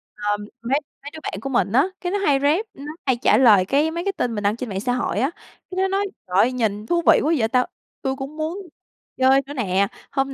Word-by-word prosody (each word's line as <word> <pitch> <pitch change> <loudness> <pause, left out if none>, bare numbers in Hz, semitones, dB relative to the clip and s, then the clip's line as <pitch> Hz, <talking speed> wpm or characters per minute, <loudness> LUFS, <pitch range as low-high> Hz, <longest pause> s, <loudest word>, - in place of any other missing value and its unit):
Ờ, 205 0 -1 0.2
mấy 260 +5 +1 0.2
mấy 285 +1 -8
đứa 315 - -8
bạn - - -4
của 270 - -4
mình 240 -6 +1
á, 270 +6 +4 0.2
cái 355 - -2
nó 405 - +1
hay 290 -8 +3
rep, 305 +10 +2
nó 285 +2 -8
hay 260 -3 +3
trả 210 - +5
lời, 210 -7 +6
cái, 290 +7 +2
mấy 340 +1 -3
cái 395 - +1
tin 240 -2 -1
mình 210 - -3
đăng 205 +1 +2
trên 240 0 -5
mạng 190 -1 -3
xã 245 +4 -1
hội 240 -4 -1
á, 270 +7 +1 0.4
cá 370 - -6
nó 380 0 +2
nói: 390 +1 0 0.2
"Trời 185 +1 -1
ơi! 235 +5 +5
Nhìn 215 -4 -1
thú 340 +8 +1
vị - - +5
quá 315 - +2
vậy 220 - +2
ta, 250 +2 +2 0.4
tui 265 0 -1
cũng 275 +3 -7
muốn 315 +4 -2 0.6
chơi 265 +1 +5
nữa 285 - -8
nè, 200 -6 +1 0.2
hôm 270 -1 -1
265 Hz, 260 wpm, -22 LUFS, 220-300 Hz, 0.6 s, lời